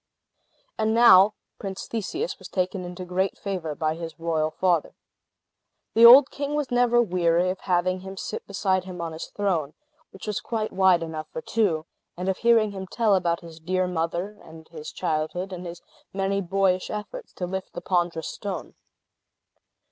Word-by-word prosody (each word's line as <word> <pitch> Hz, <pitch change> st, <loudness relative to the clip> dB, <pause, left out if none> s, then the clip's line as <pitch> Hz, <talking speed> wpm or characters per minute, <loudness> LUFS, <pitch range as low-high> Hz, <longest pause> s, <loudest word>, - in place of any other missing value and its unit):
And 220 Hz, +1 st, +2 dB
now 215 Hz, -3 st, +7 dB, 0.2 s
Prince 195 Hz, -2 st, -5 dB
Theseus 335 Hz, -, -3 dB
was -, -, -9 dB
taken 185 Hz, 0 st, -2 dB
into 180 Hz, +1 st, -7 dB
great 185 Hz, +2 st, -1 dB
favor 180 Hz, -6 st, -4 dB
by 155 Hz, 0 st, 0 dB
his 165 Hz, -1 st, -8 dB
royal 160 Hz, -2 st, 0 dB
father. 175 Hz, -1 st, 0 dB, 1.0 s
The 230 Hz, +1 st, +9 dB
old 260 Hz, +3 st, +9 dB
king 285 Hz, +1 st, -3 dB
was 295 Hz, -4 st, -2 dB
never 245 Hz, -1 st, +4 dB
weary 175 Hz, -2 st, +2 dB
of 185 Hz, -, -6 dB
having 185 Hz, 0 st, 0 dB
him 190 Hz, +1 st, -9 dB
sit -, -, -5 dB
beside 190 Hz, -2 st, 0 dB
him 180 Hz, -2 st, -8 dB
on 165 Hz, -1 st, -3 dB
his 160 Hz, -, -6 dB
throne 170 Hz, -8 st, -1 dB, 0.3 s
(which 190 Hz, -, -11 dB
was 210 Hz, -2 st, -2 dB
quite 220 Hz, -2 st, -3 dB
wide 185 Hz, -3 st, +4 dB
enough 155 Hz, -1 st, -6 dB
for 160 Hz, -, -6 dB
two), 180 Hz, -9 st, 0 dB, 0.3 s
and 180 Hz, +2 st, -2 dB
of 190 Hz, -, -1 dB
hearing 230 Hz, -3 st, +4 dB
him 190 Hz, -1 st, -7 dB
tell 220 Hz, +1 st, +2 dB
about 175 Hz, -2 st, +1 dB
his 165 Hz, -2 st, -12 dB
dear 185 Hz, +3 st, 0 dB
mother, 180 Hz, +4 st, -3 dB
and 160 Hz, 0 st, -13 dB
his 155 Hz, -2 st, -8 dB
childhood, 170 Hz, +5 st, -2 dB
and 180 Hz, 0 st, -6 dB
his 170 Hz, 0 st, -9 dB, 0.3 s
many 195 Hz, 0 st, -1 dB
boyish 185 Hz, 0 st, +1 dB
efforts 215 Hz, -, -6 dB
to 180 Hz, -, -4 dB
lift 190 Hz, +1 st, -5 dB
the -, -, -5 dB
ponderous 175 Hz, -3 st, 0 dB
stone. 200 Hz, -2 st, -6 dB
185 Hz, 170 wpm, -25 LUFS, 170-200 Hz, 1.0 s, The